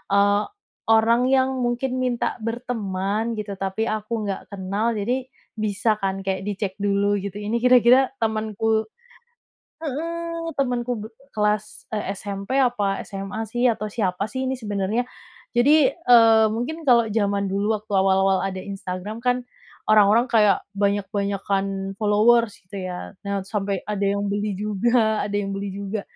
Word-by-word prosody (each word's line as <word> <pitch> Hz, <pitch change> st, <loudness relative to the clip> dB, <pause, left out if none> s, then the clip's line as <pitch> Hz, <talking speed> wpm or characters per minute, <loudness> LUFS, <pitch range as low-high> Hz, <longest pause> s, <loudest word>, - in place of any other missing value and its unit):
eee, 205 Hz, +1 st, +4 dB, 0.5 s
orang 230 Hz, +3 st, +4 dB
yang 265 Hz, -1 st, +3 dB
mungkin 250 Hz, +1 st, -1 dB
minta 245 Hz, -1 st, -1 dB
berteman, 220 Hz, -2 st, -2 dB
gitu, 205 Hz, -1 st, -4 dB
tapi 195 Hz, +3 st, -2 dB
aku 215 Hz, +1 st, -2 dB
nggak 195 Hz, -1 st, -3 dB
kenal, 200 Hz, +4 st, -2 dB
jadi 250 Hz, +5 st, -1 dB, 0.3 s
bisa 215 Hz, +1 st, 0 dB
kan, 195 Hz, -1 st, -2 dB
kayak 190 Hz, 0 st, -2 dB
dicek 200 Hz, -1 st, -2 dB
dulu, 200 Hz, 0 st, +1 dB
gitu. 200 Hz, 0 st, -6 dB
Ini 210 Hz, +3 st, -2 dB
kira-kira, 250 Hz, +2 st, +5 dB
temenku 220 Hz, 0 st, 0 dB, 1.0 s
heeh, 335 Hz, +3 st, -4 dB
temenku 250 Hz, -3 st, -1 dB
be -, -, -6 dB, 0.3 s
kelas, 210 Hz, 0 st, -1 dB
eee, 205 Hz, -2 st, -2 dB
SMP, 200 Hz, +5 st, -4 dB
apa 240 Hz, -7 st, +1 dB
SMA 195 Hz, +3 st, -5 dB
sih, 245 Hz, +1 st, +2 dB
atau 215 Hz, -2 st, -1 dB
siapa 195 Hz, -3 st, -1 dB
sih 260 Hz, 0 st, -2 dB
ini 265 Hz, -, -1 dB
sebenarnya. 210 Hz, 0 st, -1 dB, 0.5 s
Jadi, 285 Hz, +3 st, +6 dB
eee, 230 Hz, -8 st, +6 dB
mungkin 255 Hz, +9 st, -3 dB
kalau 235 Hz, -2 st, +6 dB
zaman 200 Hz, -2 st, +1 dB
dulu, 205 Hz, +3 st, +1 dB
waktu 210 Hz, 0 st, -16 dB
awal-awal 190 Hz, 0 st, +3 dB
ada 190 Hz, -1 st, -3 dB
Instagram 195 Hz, +2 st, -6 dB
kan, 250 Hz, 0 st, +1 dB, 0.5 s
orang-orang 215 Hz, +2 st, +5 dB
kayak 210 Hz, -3 st, +4 dB
banyak-banyakan 200 Hz, -1 st, -1 dB
followers, 220 Hz, +1 st, +3 dB
gitu 185 Hz, 0 st, -6 dB
ya. 180 Hz, +2 st, -7 dB
Nah, 200 Hz, 0 st, -1 dB
sampai 195 Hz, -2 st, -2 dB
ada 205 Hz, -1 st, -2 dB
yang 200 Hz, +1 st, 0 dB
beli 205 Hz, 0 st, -1 dB
juga 220 Hz, +2 st, +1 dB
ada 205 Hz, -, -3 dB
yang 200 Hz, -1 st, -2 dB
beli 200 Hz, 0 st, -4 dB
juga. 200 Hz, +1 st, -4 dB
210 Hz, 140 wpm, -23 LUFS, 200-235 Hz, 1.0 s, Jadi